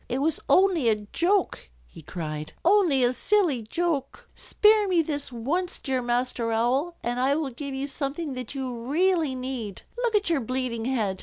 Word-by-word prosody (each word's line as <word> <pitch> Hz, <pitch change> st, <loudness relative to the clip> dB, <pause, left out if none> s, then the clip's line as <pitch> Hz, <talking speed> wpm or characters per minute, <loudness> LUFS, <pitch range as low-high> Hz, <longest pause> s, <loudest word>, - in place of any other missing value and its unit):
"It 250 Hz, -, -1 dB
was 305 Hz, +2 st, 0 dB
only 365 Hz, -10 st, +4 dB
a 220 Hz, -, +4 dB, 0.2 s
joke," 360 Hz, -, +1 dB, 0.2 s
he -, -, -14 dB
cried. 155 Hz, -2 st, -6 dB
"Only 345 Hz, -9 st, +4 dB
a 245 Hz, +1 st, +3 dB
silly 345 Hz, -, +2 dB
joke. 310 Hz, +5 st, -2 dB
Spare 425 Hz, -1 st, +3 dB
me 350 Hz, -3 st, +3 dB
this 290 Hz, -3 st, -4 dB
once, 300 Hz, +10 st, -2 dB
dear 260 Hz, -2 st, -2 dB
Master 240 Hz, -1 st, -1 dB
Owl, 260 Hz, +10 st, 0 dB
and 240 Hz, +1 st, -2 dB
I 270 Hz, +2 st, +2 dB
will 300 Hz, -3 st, -2 dB
give 275 Hz, +2 st, -6 dB
you 270 Hz, +1 st, -2 dB
something 285 Hz, +2 st, -4 dB
that 255 Hz, +1 st, -6 dB
you 260 Hz, -2 st, -3 dB
really 305 Hz, +5 st, +1 dB
need. 255 Hz, -6 st, -5 dB
Look 480 Hz, -3 st, 0 dB
at 415 Hz, -1 st, +2 dB
your 330 Hz, -5 st, +1 dB
bleeding 245 Hz, -1 st, -3 dB
head. 215 Hz, -7 st, -1 dB
270 Hz, 175 wpm, -26 LUFS, 240-340 Hz, 0.2 s, only